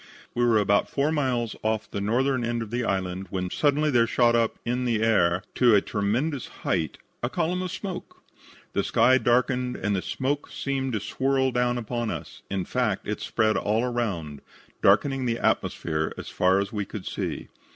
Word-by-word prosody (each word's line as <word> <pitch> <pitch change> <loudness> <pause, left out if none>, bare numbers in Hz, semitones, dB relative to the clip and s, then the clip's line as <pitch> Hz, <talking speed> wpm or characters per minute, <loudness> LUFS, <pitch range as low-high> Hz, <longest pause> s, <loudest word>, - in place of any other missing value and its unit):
"We 120 - +1
were 115 -2 +4
about 100 -1 +2
four 145 +2 +1
miles 125 -7 0
off 110 0 -1
the 100 - -3
northern 125 +5 +1
end 120 0 -1
of 110 - -10
the 120 +1 -1
island 95 -2 -2
when 90 -1 -3
suddenly 150 +1 +2
there 120 -3 +4
shot 120 0 +3
up 115 -1 +1
in 125 +1 -1
the 115 -3 +1
air 90 -5 +3
to 120 -4 +5
a 100 - +5
tremendous 120 +9 -1 0.2
height 80 - 0 0.2
a - - -1
column 180 +3 -1
of 185 - -3
smoke. 185 -2 -7 0.5
The - - +1
sky 130 +1 +4
darkened 125 +1 +1
and 105 +1 -1
the 95 - -1
smoke 140 +7 -2
seemed 135 -2 -2
to 110 - 0
swirl 130 +5 0
down 125 0 +1
upon 120 0 -2
us. - - -6
In 95 -2 -2
fact, 120 -6 -1
it 105 0 -3
spread 110 -1 +1
all 110 +3 +1
around, 100 - -2 0.4
darkening 135 -2 +3
the 115 -1 0
atmosphere 80 -8 0
as - - -7
far 95 +1 +3
as 100 +1 -3
we 105 -1 -1
could 100 0 -8
see. - - -4
120 Hz, 185 wpm, -26 LUFS, 100-130 Hz, 0.5 s, to